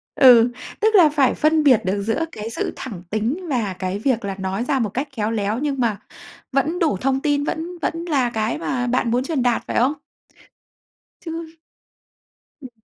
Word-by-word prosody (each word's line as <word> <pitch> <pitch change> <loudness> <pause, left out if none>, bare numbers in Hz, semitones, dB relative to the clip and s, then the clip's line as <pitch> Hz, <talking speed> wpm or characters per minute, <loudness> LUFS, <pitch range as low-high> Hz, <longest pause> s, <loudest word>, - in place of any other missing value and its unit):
Ừ, 245 -3 +7 0.3
tức 435 0 +3
là 345 -6 +7
phải 285 -3 +2
phân 310 0 +2
biệt 260 -6 +5
được 195 +2 0
giữa 225 +10 0
cái 215 +1 -6
sự - - -3
thẳng 210 -10 -7
tính 240 - -2
và 225 -8 -1
cái 185 +2 -2
việc 235 -3 0
là 195 -1 -3
nói 190 +3 -2
ra 270 +2 0
một 225 -4 0
cách 265 +8 -3
khéo 215 -1 -1
léo, 215 0 -1
nhưng 280 -1 -2
mà 230 -4 +1 0.5
vẫn 285 +6 0
đủ 315 - +1
thông 265 0 +1
tin, 290 -1 +1
vẫn 330 +4 -4
vẫn 330 +3 -2
là 265 -6 +2
cái 220 +1 -1
mà 250 -6 -2
bạn 240 -1 0
muốn 250 +2 +1
truyền 275 -3 -1
đạt, 245 -2 +1
phải - - -2
không? 255 +5 +3 1.3
Chứ 330 -1 -7 1.0
Ừm. 260 - -9
255 Hz, 190 wpm, -21 LUFS, 220-300 Hz, 1.3 s, Ừ